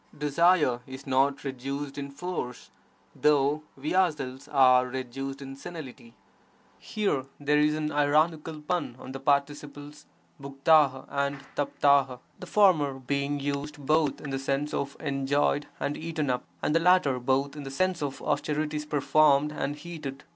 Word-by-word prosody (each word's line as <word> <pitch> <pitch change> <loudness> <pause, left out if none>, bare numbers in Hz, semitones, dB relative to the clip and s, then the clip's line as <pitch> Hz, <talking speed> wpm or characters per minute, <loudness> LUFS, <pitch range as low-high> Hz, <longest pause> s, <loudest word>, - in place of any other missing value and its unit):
Desire 150 -3 +3
is 130 +1 -9
not 135 +1 +1
reduced 140 +1 -5
in 140 -1 -5
force, 140 -4 -6 0.4
though 150 0 +2 0.2
we 145 +5 -3
ourselves 145 -7 0
are 130 -3 +5
reduced 130 +2 -5
to 135 -1 -8
senility. 135 -6 -10 0.6
[Here 200 -12 -1
there 150 +1 +2
is 150 0 +3
an 155 0 -2
ironical 155 +2 +1
pun 150 -6 -2
on 130 - -9
the 135 - -6
participles 145 +1 -2 0.3
"grfiT: 140 0 +3
and 140 0 -1 0.2
dKli:, 140 -2 +2 0.2
the - - -8
former 165 -10 +4
being 140 +2 -2
used 145 +1 -3
both 150 0 +1
in 140 - -7
the 135 - -2
sense 135 +2 -2
of 140 0 -3
'enjoyed' 140 0 0
and 145 - -2
'eaten 155 -4 -2
up', 125 - -2 0.2
and - - +1
the 165 - +4
latter 165 -7 +3
both 135 +3 0
in 150 - -6
the 135 - -7
sense 185 +5 0
of 140 -2 -4
'(austerities) 150 +1 -1
performed' 150 0 +3
and 145 -1 -3
'heated'. 150 -4 -8
145 Hz, 145 wpm, -27 LUFS, 135-150 Hz, 0.6 s, are